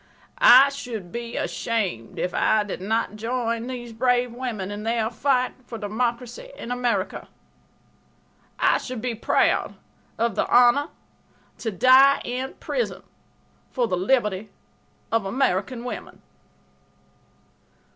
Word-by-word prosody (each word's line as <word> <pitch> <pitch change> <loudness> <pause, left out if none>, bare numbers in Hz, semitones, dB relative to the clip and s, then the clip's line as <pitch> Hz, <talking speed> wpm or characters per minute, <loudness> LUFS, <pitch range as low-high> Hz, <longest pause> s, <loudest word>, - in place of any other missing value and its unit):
I 390 - +8
should 240 -10 -7
be 235 0 -5
ashamed 195 - -2
if 180 - -2
I 215 -1 +2
did 200 -3 -6
not 215 +1 -1
join 230 0 -2
these 240 -2 -6
brave 245 +1 +1
women 230 -6 -4
in 205 0 -5
their 225 0 -1
fight 255 +1 +1
for 240 -1 -8
democracy 235 - -3
in 240 - -7
America. 240 -6 -1 1.3
I - - +3
should 255 -2 -6
be 245 +1 -2
proud 225 - +1 0.4
of 230 -1 0
the - - 0
honor 245 +4 +5 0.7
to 225 - -2
die 260 +7 +6
in 255 +2 -4
prison - - -3 0.7
for 245 -2 0
the 185 - 0
liberty 210 0 0 0.6
of 225 -2 +2
American 230 +1 -1
women." 250 - -7
235 Hz, 120 wpm, -24 LUFS, 215-250 Hz, 1.3 s, I